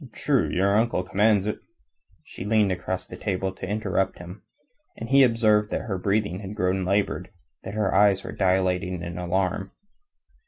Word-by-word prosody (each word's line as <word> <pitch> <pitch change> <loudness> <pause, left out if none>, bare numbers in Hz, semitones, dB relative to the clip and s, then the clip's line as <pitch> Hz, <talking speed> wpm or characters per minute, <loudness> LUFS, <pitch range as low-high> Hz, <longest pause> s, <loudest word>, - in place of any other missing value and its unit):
True, 140 -5 +1
your 100 +3 +2
uncle 110 -4 +1
commands 105 0 +2
it...." 105 - -3 0.6
She - - -9
leaned 105 -1 +2
across 90 0 -3
the - - -10
table 95 -1 -2
to - - -7
interrupt 100 -3 -1
him, 90 +4 -10 0.6
and 115 - -6
he 135 +3 +5
observed 110 -4 +3
that - - -2
her 100 -6 -4
breathing 100 -1 0
had 100 0 -7
grown 95 0 0
labored, 100 +2 -1 0.3
that 95 +2 -7
her 105 -3 0
eyes 100 -1 +4
were - - -6
dilating 90 -1 0
in 85 0 -6
alarm. 95 +2 -1
95 Hz, 165 wpm, -25 LUFS, 95-105 Hz, 0.6 s, he